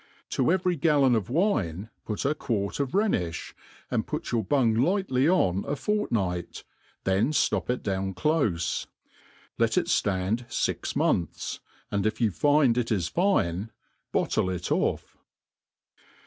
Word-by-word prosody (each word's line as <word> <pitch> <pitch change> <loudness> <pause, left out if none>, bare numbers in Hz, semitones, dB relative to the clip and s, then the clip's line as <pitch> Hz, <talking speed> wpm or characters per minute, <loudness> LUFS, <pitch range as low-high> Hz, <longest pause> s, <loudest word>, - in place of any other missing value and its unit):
To - - -1
evei'y 180 0 +1
galloaof 135 - +3
wine 115 - 0 0.2
put 105 +4 -3
a 140 - +3
quart 110 -8 -2
of 140 -2 -1
Rhenifli, 100 - 0 0.4
and - - 0
put - - -4
your 115 -2 +1
bung 120 +2 +2
ligMly 140 - +2
on 95 - +2
a - - -2
fortpi^bt, 110 - -2 0.4
then 95 +9 +2
ftop 150 - +1
it 125 - -1
down 95 -1 -2
clofe. 105 - 0 0.7
Let - - +2
It - - +3
ftand 100 +5 0
fix - - -1
manthss 85 - -1 0.3
and 100 0 +1
if 110 - -1
yoti 110 -5 +1
find 140 - +3
it 115 -1 -2
is 90 -6 0
fine, 110 - +1 0.4
bottle 95 - +1
it 90 -1 -4
off. - - -1
115 Hz, 135 wpm, -27 LUFS, 95-145 Hz, 0.7 s, galloaof